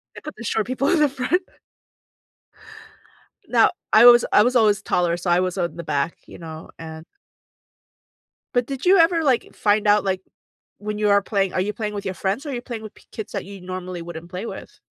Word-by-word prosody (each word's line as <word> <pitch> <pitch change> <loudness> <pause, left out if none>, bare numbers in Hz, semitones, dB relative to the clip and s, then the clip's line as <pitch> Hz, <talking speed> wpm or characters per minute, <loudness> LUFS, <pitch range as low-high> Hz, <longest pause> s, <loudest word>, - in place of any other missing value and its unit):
They - - -10
put 305 - -8
the - - -8
short 220 -1 -1
people 260 +2 0
in 350 - +3
the 300 -1 +4
front. 275 +7 0 2.1
Now, - - +4 0.2
I 220 +2 +8
was 240 -1 +8
I 210 - +6
was 250 +3 +1
always 215 -4 +4
taller, 175 -1 0
so 175 +1 -4
I 175 +1 +4
was 185 0 -1
on 175 -2 -2
the 170 - -6
back, 150 +1 -2
you - - -12
know, 160 -1 -9
and 160 0 -9 1.5
But 245 -1 +2
did 270 +3 -6
you 380 +2 +6
ever, 330 -1 +4
like, 265 -5 +1
find 210 0 +1
out, 205 0 +4
like, 190 -1 -1 0.6
when 210 +1 -5
you 210 0 +1
are 200 0 +5
playing 195 -2 -1
Are 185 - 0
you 205 +3 -1
playing 210 0 -4
with 200 -1 -5
your 190 - -2
friends 195 - -2
or - - -5
are - - -3
you 240 - -4
playing 235 -3 -7
with 215 - -9
p - - -21
kids 220 - -7
that 200 -3 -4
you 195 -1 -10
normally 185 -1 -6
wouldn't 170 0 -9
play 185 +5 -6
with? - - -9
205 Hz, 220 wpm, -22 LUFS, 180-240 Hz, 2.1 s, I